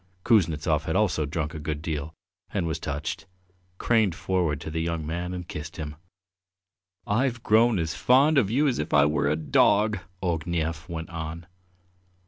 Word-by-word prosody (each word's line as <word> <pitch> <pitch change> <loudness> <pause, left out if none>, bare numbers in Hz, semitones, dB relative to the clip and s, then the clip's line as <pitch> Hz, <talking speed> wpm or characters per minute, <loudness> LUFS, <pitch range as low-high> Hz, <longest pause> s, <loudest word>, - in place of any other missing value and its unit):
Kuznetsov, 80 - +3
who - - -16
had 80 - -1
also 95 -7 +1
drunk 75 0 -3
a 80 - -6
good 75 0 -3
deal 80 -1 -4 0.4
and - - -1
was 80 0 -2
touched, 80 +2 -4 0.5
craned 110 -6 +2
forward 85 -7 0
to 80 - -6
the 80 +1 -2
young 85 -1 -2
man 85 +3 -3
and 90 -1 -6
kissed 75 +1 -7
him. 75 -2 -5 1.1
"I've 120 +2 0
grown 110 0 +4
as 80 -2 -1
fond 135 - +4
of 100 - +1
you 140 +7 +2
as 130 - 0
if 75 - -1
I 70 -1 +6
were 75 -1 +1
your 75 - +2
dog," 100 +7 +3 0.2
Ognev 85 -1 -2
went 80 0 -5
on. 80 0 -6
80 Hz, 170 wpm, -26 LUFS, 75-95 Hz, 1.1 s, I